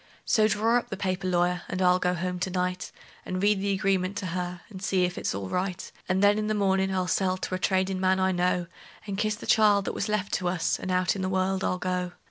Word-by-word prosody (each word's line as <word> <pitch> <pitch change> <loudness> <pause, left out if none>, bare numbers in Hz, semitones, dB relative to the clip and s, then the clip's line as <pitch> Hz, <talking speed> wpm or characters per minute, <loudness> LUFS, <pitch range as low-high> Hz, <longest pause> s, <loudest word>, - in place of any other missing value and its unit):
So 215 -1 +4
draw 225 +3 +2
up - - -11
the 195 - -4
paper, 185 -1 -2
lawyer, 175 0 +1
and 185 - -3
I'll 180 0 +4
go 180 0 +1
home 180 +1 -3
to 185 +1 -1
night, 180 0 -2 0.3
And 185 - -3
read 205 0 +2
the 200 0 0
agreement 190 0 0
to - - -3
her, 180 -1 -4
and 190 -4 -10
see 190 -1 +1
if 180 0 -1
it's - - -2
all 100 -1 -4
right; 185 - -3 0.2
And 190 +2 +2
then, 205 +1 +5
in 215 - -1
the 215 - 0
mornin', 190 -1 +2
I'll 185 -1 0
sell 185 0 +1
to 185 - -5
a 185 - -1
tradin' 190 0 +1
man 185 0 +2
I 190 0 +2
know, 180 0 +1 0.4
And 200 -2 -4
kiss 215 +1 0
the - - -10
child 205 -2 +4
that - - -2
was 205 - -3
left 205 -2 -1
to 180 - 0
us, 175 -2 0
and - - -5
out 185 +1 +1
in 195 - -4
the 185 - -1
world 190 0 0
I'll 185 - 0
go. 180 -1 -2
185 Hz, 260 wpm, -27 LUFS, 180-195 Hz, 0.4 s, then